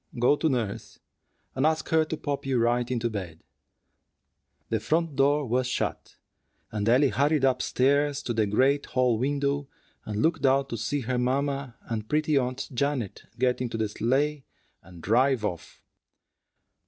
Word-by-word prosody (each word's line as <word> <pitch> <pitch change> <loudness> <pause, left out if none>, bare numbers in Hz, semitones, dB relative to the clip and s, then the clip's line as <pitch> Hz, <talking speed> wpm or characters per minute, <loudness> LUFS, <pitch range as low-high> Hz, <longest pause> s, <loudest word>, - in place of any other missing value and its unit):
Go 120 +4 +4
to 160 +2 0
nurse, 115 -7 -3 0.6
and 130 - -1
ask 160 +1 +1
her 160 0 +4
to 155 0 -4
pop 145 -2 -3
you 130 -2 +1
right 120 +1 +1
into 120 -2 0
bed." 95 -8 -6 1.3
The 110 - 0
front 160 +6 0
door 140 +2 +3
was 125 +1 0
shut, 125 - -3 0.6
and 105 0 -1
Ellie 130 +4 +5
hurried 145 +1 +2
up 130 -1 +2
stairs 140 +2 +1
to 120 - -2
the 110 -2 +1
great 135 +7 +2
hall 125 -3 +1
window, 140 +1 -1 0.4
and 105 0 -3
looked 165 0 +1
out 135 0 +3
to 120 - -3
see 140 +6 -2
her 125 +1 -1
mamma 135 0 -1
and 110 -2 -5
pretty 155 0 +1
Aunt 130 -1 -1
Janet 130 -5 -2
get 125 0 +1
into 120 -2 -3
the 110 -1 -1
sleigh 135 +7 0 0.4
and 85 -1 -14
drive 125 +1 +2
off. 90 -5 -6
130 Hz, 160 wpm, -27 LUFS, 115-140 Hz, 1.3 s, Ellie